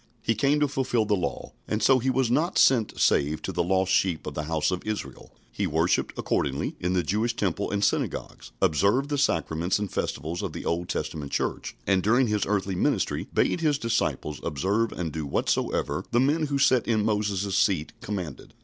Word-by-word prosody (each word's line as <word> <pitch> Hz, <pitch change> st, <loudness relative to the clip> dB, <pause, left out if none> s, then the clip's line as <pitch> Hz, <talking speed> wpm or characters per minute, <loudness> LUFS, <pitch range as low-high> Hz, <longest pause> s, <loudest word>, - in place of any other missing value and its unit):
He 115 Hz, -, +2 dB
came 140 Hz, +7 st, +2 dB
to 145 Hz, -, +4 dB
fulfil 130 Hz, -5 st, 0 dB
the 105 Hz, -, +2 dB
law, 90 Hz, -, -4 dB, 0.2 s
and 105 Hz, 0 st, -1 dB
so 135 Hz, -1 st, +5 dB
He 130 Hz, +2 st, 0 dB
was 130 Hz, -2 st, +1 dB
not 165 Hz, +8 st, +1 dB
sent 120 Hz, -5 st, +3 dB
save 75 Hz, +2 st, +2 dB
to -, -, -3 dB
the -, -, 0 dB
lost 95 Hz, +2 st, +1 dB
sheep 95 Hz, -4 st, +1 dB
of 75 Hz, -, -5 dB
the 75 Hz, +1 st, -4 dB
house 80 Hz, +2 st, 0 dB
of 90 Hz, -, -2 dB
Israel. 105 Hz, -11 st, -5 dB, 0.2 s
He -, -, -1 dB
worshipped, -, -, 0 dB
accordingly, -, -, -1 dB
in 90 Hz, +1 st, -1 dB
the 90 Hz, -1 st, +1 dB
Jewish 110 Hz, +8 st, 0 dB
temple 100 Hz, -1 st, -1 dB
and 100 Hz, 0 st, -1 dB
synagogues, -, -, -2 dB
observed 105 Hz, -, +2 dB
the 145 Hz, -1 st, 0 dB
sacraments 85 Hz, -, +1 dB
and 105 Hz, -2 st, -4 dB
festivals 80 Hz, +5 st, -3 dB
of -, -, -4 dB
the -, -, -6 dB
Old 85 Hz, +1 st, -1 dB
Testament 75 Hz, -2 st, -4 dB
Church, -, -, -2 dB
and 95 Hz, -1 st, +2 dB
during 120 Hz, +7 st, +3 dB
His 105 Hz, -3 st, 0 dB
earthly 100 Hz, -1 st, 0 dB
ministry 90 Hz, -, 0 dB
bade 175 Hz, -, +1 dB
His 150 Hz, -3 st, +2 dB
disciples 115 Hz, -, -1 dB
observe 100 Hz, +10 st, 0 dB
and 85 Hz, -3 st, -4 dB
do 80 Hz, +1 st, -4 dB
whatsoever -, -, -1 dB
the 120 Hz, -, +2 dB
men 150 Hz, +4 st, +2 dB
who 140 Hz, -1 st, -1 dB
sat 130 Hz, -3 st, +3 dB
in 110 Hz, -3 st, +1 dB
Moses' 105 Hz, -3 st, 0 dB
seat 90 Hz, -6 st, +1 dB
commanded. 90 Hz, -9 st, -6 dB
100 Hz, 195 wpm, -26 LUFS, 85-120 Hz, 0.2 s, so